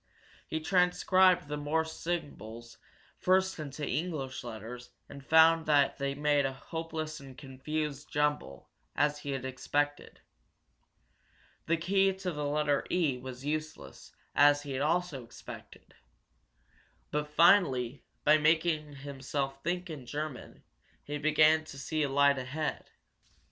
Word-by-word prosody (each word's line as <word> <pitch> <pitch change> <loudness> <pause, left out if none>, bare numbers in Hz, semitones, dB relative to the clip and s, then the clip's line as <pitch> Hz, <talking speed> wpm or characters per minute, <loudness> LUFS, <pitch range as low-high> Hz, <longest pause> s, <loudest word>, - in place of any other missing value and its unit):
He 160 - -2
transcribed 180 0 +3
the 150 0 -3
Morse 160 +2 -1
symbols 120 - -6 0.4
first 190 -1 +2
into 145 -1 -5
English 150 -6 -3
letters 120 +1 -8 0.2
and 140 - -11
found 160 +2 +5
they 140 -2 +2
made 145 0 +2
a 135 0 -1
hopeless 160 +1 -5
and 135 -2 -12
confused 145 +1 -4
jumble, 150 - -1 0.2
as 145 +1 +1
he 145 - -7
had 130 -1 -4
expected. 145 +3 -2 1.5
The 170 - +2
key 195 +3 +2
to 185 -1 -4
the 150 -2 -3
letter 145 -1 +1
E 155 -8 +1
was 130 +1 -8
useless, 155 +1 -5 0.2
as 145 0 +5
he 145 - -7
had 130 0 -2
also 160 -3 0
expected. 115 - -12 1.2
But 150 0 -1
finally, 145 -6 +3 0.2
by 155 +1 +5
making 155 -1 +2
himself 135 0 -4
think 180 +2 -2
in 135 -6 -8
German, 150 -1 -6 0.4
he 145 0 -5
began 155 +1 +4
to 140 - -10
see 155 +3 -2
a 145 - +1
light 140 0 +4
ahead. 145 +5 -4
150 Hz, 130 wpm, -30 LUFS, 135-160 Hz, 1.5 s, found